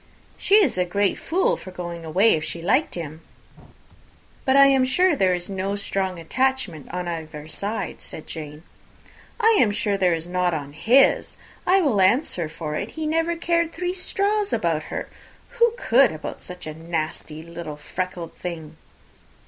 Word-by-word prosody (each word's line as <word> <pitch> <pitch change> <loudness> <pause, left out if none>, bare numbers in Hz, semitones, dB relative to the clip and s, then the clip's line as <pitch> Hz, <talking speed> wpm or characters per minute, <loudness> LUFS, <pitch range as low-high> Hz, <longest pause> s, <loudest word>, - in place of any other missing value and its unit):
"She 400 - +2
is 355 - +4
a - - +4
great 200 +2 0
fool 370 +3 +1
for - - -10
going 175 -2 -6
away, 190 +8 +4
if 155 - -1
she 170 - -4
liked 260 - +2
him." 160 -2 -6 1.2
"But 265 - +3
I 275 0 +7
hope 280 +5 +3
there 185 -1 +4
is 175 0 -6
no 195 +1 -2
strong 195 -2 -2
attachment 220 - -1
on 180 0 -3
either 155 -3 -6
side," 205 +7 -4
said 155 - -8
Jane. 150 -1 -8 0.8
"I 450 0 +5
am 230 - +4
sure 205 -1 0
there 180 -3 +3
is 165 0 -6
not 180 -1 0
on 145 -2 -6
his. 245 - +3 0.3
I 380 +2 +5
will 250 - +2
answer 185 - +2
for 160 -1 -5
it, 200 +8 -3
he 315 - -2
never 330 +2 +1
cared 335 0 0
three 360 0 -2
straws 400 +2 0
about 160 -2 0
her. - - -4 0.5
Who 470 0 +6
could 260 - +4
about 155 - -7
such 180 0 -8
a 155 - -5
nasty 160 -1 -4
little 170 -2 -7
freckled 175 +1 -5
thing?" 160 -3 -7
185 Hz, 165 wpm, -23 LUFS, 165-270 Hz, 1.2 s, I